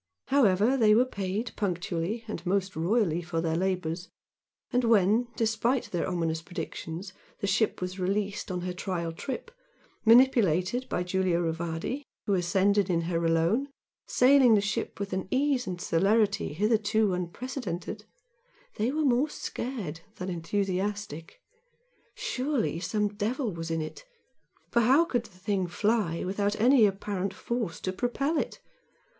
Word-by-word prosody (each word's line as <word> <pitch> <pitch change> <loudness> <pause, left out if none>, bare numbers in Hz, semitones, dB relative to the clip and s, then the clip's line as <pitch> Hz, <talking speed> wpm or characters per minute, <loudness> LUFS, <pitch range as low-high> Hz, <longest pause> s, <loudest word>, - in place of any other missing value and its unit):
However, 240 -2 +4
they 215 -3 +5
were 245 +3 +5
paid 200 0 -3
punctually 185 +2 -2
and 195 -6 -5
most 190 +1 0
royally 175 0 +1
for 165 -1 -3
their 165 -1 0
labours; 180 -1 -1 0.6
and 250 +1 +3
when, 225 +1 +4
despite 230 +3 0
their 175 - -1
ominous 165 -3 -1
predictions, 170 +1 -6 0.3
the - - -2
ship 210 +2 +1
was 180 +1 -4
released 200 +2 -1
on 180 -1 -2
her 180 0 -3
trial 180 -2 -3
trip, 265 - -6 0.5
manipulated 230 -2 +4
by 175 - -1
Giulio 180 -1 +1
Rivardi, 165 - -2 0.2
who 205 - +1
ascended 195 +2 +2
in 170 -2 +2
her 170 0 -1
alone, 165 +11 +2 0.4
sailing 255 -2 +6
the - - +4
ship 205 0 -2
with 200 -1 -4
an 190 0 -2
ease 265 -1 +1
and 180 -1 -4
celerity 200 +2 +2
hitherto 210 +2 +2
unprecedented, 205 +1 -4 0.7
they 220 +3 +1
were 305 +1 0
more 265 +3 +3
scared 220 - -5 0.2
than 185 +1 -5
enthusiastic. 190 - -3 0.7
Surely 255 - -1
some 210 +3 0
devil 215 +4 -2
was 165 0 -5
in 165 -1 -1
it! 155 - -8 0.7
for 235 - +4
how 270 +9 +5
could 245 -8 -1
the 180 - -16
thing 190 -1 -1
fly 195 -2 0
without 200 +2 -1
any 240 -1 +6
apparent 195 -1 -3
force 230 -3 -3
to 185 - -3
propel 275 - 0
it? - - -4
200 Hz, 140 wpm, -28 LUFS, 175-230 Hz, 0.7 s, sailing